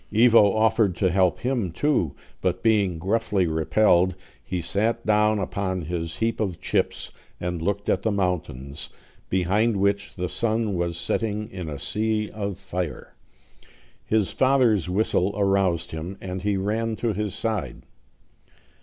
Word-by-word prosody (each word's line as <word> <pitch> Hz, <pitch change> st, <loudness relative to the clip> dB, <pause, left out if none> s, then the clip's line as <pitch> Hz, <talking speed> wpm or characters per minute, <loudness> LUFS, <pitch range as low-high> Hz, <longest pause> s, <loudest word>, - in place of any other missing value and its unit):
Ivo 110 Hz, -2 st, +6 dB
offered 110 Hz, -3 st, +3 dB
to 95 Hz, 0 st, +1 dB
help 90 Hz, -1 st, +2 dB
him 120 Hz, -8 st, -1 dB
too; 110 Hz, -, 0 dB, 0.3 s
but -, -, -1 dB
being 100 Hz, -6 st, +3 dB
gruffly 100 Hz, +1 st, +1 dB
repelled, 85 Hz, +3 st, +3 dB, 0.3 s
he 90 Hz, +7 st, -3 dB
sat 105 Hz, +7 st, -1 dB
down 105 Hz, 0 st, +3 dB
upon 95 Hz, -2 st, -2 dB
his 85 Hz, 0 st, -3 dB
heap 115 Hz, 0 st, -1 dB
of 95 Hz, -6 st, -2 dB
chips, -, -, -1 dB, 0.3 s
and 90 Hz, -1 st, -3 dB
looked 100 Hz, +3 st, -1 dB
at 95 Hz, -, +2 dB
the 110 Hz, -, 0 dB
mountains, 80 Hz, -8 st, -2 dB, 0.4 s
behind 100 Hz, +5 st, +2 dB
which 100 Hz, 0 st, 0 dB
the 90 Hz, -1 st, -2 dB
sun 110 Hz, +1 st, -1 dB
was 85 Hz, -1 st, -1 dB
setting 105 Hz, +4 st, -2 dB
in 90 Hz, -6 st, -5 dB
a 75 Hz, -, -5 dB
sea 105 Hz, +7 st, -1 dB
of 100 Hz, -3 st, -4 dB
fire. 90 Hz, -6 st, -5 dB, 0.9 s
His 110 Hz, -3 st, +1 dB
father's 125 Hz, -, +3 dB
whistle 100 Hz, 0 st, +1 dB
aroused 95 Hz, -4 st, +1 dB
him, 85 Hz, +5 st, -5 dB
and 95 Hz, 0 st, -5 dB
he 100 Hz, 0 st, 0 dB
ran 110 Hz, +3 st, -1 dB
to 115 Hz, 0 st, -1 dB
his 105 Hz, -1 st, -3 dB
side. 110 Hz, -1 st, -3 dB
100 Hz, 145 wpm, -25 LUFS, 90-110 Hz, 0.9 s, Ivo